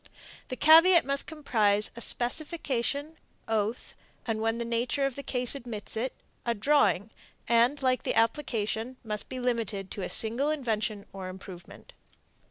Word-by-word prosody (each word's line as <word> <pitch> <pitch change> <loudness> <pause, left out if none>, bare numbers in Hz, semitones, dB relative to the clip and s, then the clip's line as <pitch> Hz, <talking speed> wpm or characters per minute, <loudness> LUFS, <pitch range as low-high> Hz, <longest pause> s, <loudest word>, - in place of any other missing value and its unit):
The 255 - -5
caveat 330 +5 +7
must 275 0 -2
comprise 215 -9 +2
a 235 - -6
specification, 285 +3 0 0.3
oath, 220 +1 -2 0.3
and, 225 -2 -2
when 225 +1 0
the 235 - -3
nature 235 +4 -1
of 275 -2 -2
the 280 - -6
case 250 -3 +1
admits 235 -7 -6
of 220 - -1
it, 260 - -5 0.3
a 235 -1 -1
drawing, 210 - +2 0.4
and, 235 +5 +3
like 255 -1 +2
the - - -2
application, 230 -1 -1
must 210 -2 -4
be 255 - -5
limited 225 -6 -2
to 200 - -6
a - - -4
single 235 +6 +1
invention 220 -8 -2
or 190 -1 -7
improvement. 185 -1 -12
235 Hz, 155 wpm, -28 LUFS, 215-275 Hz, 0.4 s, caveat